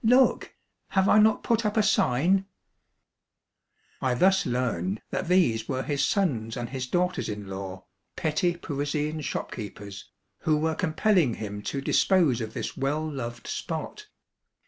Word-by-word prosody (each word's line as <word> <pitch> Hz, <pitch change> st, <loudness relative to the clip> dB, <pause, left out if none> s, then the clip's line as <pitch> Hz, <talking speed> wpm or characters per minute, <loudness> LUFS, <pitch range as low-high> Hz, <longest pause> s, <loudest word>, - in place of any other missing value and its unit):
Look! 250 Hz, +4 st, +3 dB, 0.4 s
Have 190 Hz, 0 st, +5 dB
I 210 Hz, -, +6 dB
not 215 Hz, 0 st, +4 dB
put 230 Hz, -1 st, +1 dB
up 210 Hz, 0 st, -1 dB
a 215 Hz, -, +5 dB
sign? 190 Hz, -, +2 dB, 0.7 s
" -, -, -59 dB, 0.7 s
I 130 Hz, -1 st, +1 dB
thus 190 Hz, +6 st, +3 dB
learned 110 Hz, -6 st, -1 dB
that -, -, -2 dB
these 155 Hz, -12 st, +2 dB
were 130 Hz, -1 st, -1 dB
his 145 Hz, -2 st, 0 dB
sons 120 Hz, -, 0 dB
and 120 Hz, -, -4 dB
his 130 Hz, -2 st, -3 dB
daughters 180 Hz, +2 st, 0 dB
in 105 Hz, -1 st, -5 dB
law, 95 Hz, -1 st, -7 dB, 0.3 s
petty 170 Hz, +3 st, 0 dB
Parisian 150 Hz, 0 st, -2 dB
shopkeepers, 105 Hz, -7 st, -6 dB, 0.3 s
who 155 Hz, -1 st, +2 dB
were 160 Hz, +1 st, 0 dB
compelling 165 Hz, -, +2 dB
him 105 Hz, -1 st, -6 dB
to 140 Hz, -, -3 dB
dispose 155 Hz, -, +3 dB
of 110 Hz, -1 st, -5 dB
this -, -, -4 dB
well 145 Hz, +4 st, -1 dB
loved 120 Hz, -5 st, -5 dB
spot. 165 Hz, -, -5 dB
150 Hz, 145 wpm, -27 LUFS, 120-185 Hz, 0.7 s, I